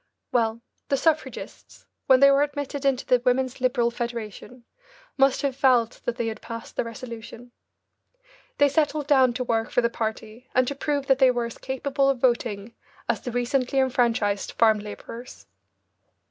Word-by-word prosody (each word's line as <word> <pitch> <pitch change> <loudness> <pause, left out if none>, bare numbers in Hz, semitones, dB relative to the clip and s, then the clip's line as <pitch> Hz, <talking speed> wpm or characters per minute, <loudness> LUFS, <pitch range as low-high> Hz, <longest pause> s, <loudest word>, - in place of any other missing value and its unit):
Well, 230 -1 0 0.3
the 275 - +2
suffragists, 315 +1 -2 0.2
when 260 0 +6
they 275 0 +8
were 275 +1 +4
admitted 285 -1 -3
into 270 -1 +1
the 250 -1 +3
Women's 255 0 0
Liberal 240 -2 +2
Federation 235 0 -6 0.5
must 270 +1 +3
have 275 -2 0
felt 250 -4 +2
that 240 - -1
they 240 -2 -2
had 225 -1 -4
passed 230 -1 -8
their - - -1
resolution. 230 0 -9 1.1
They 285 - +5
settled 295 +1 0
down 265 -4 +4
to 250 +1 -2
work 225 -2 -1
for 245 - +2
the 235 0 0
party 220 +2 -5
and 255 0 +3
to 280 - -1
prove 285 0 -2
that 270 -1 +3
they 265 -2 +6
were 245 -1 0
as 235 - -8
capable 275 +1 0
of 275 - +1
voting 235 -3 0 0.3
as 235 -2 0
the 245 - -5
recently 250 +2 0
enfranchised 235 -6 +1
farm 220 -2 +4
labourers. 230 +4 -9
250 Hz, 165 wpm, -25 LUFS, 235-270 Hz, 1.1 s, they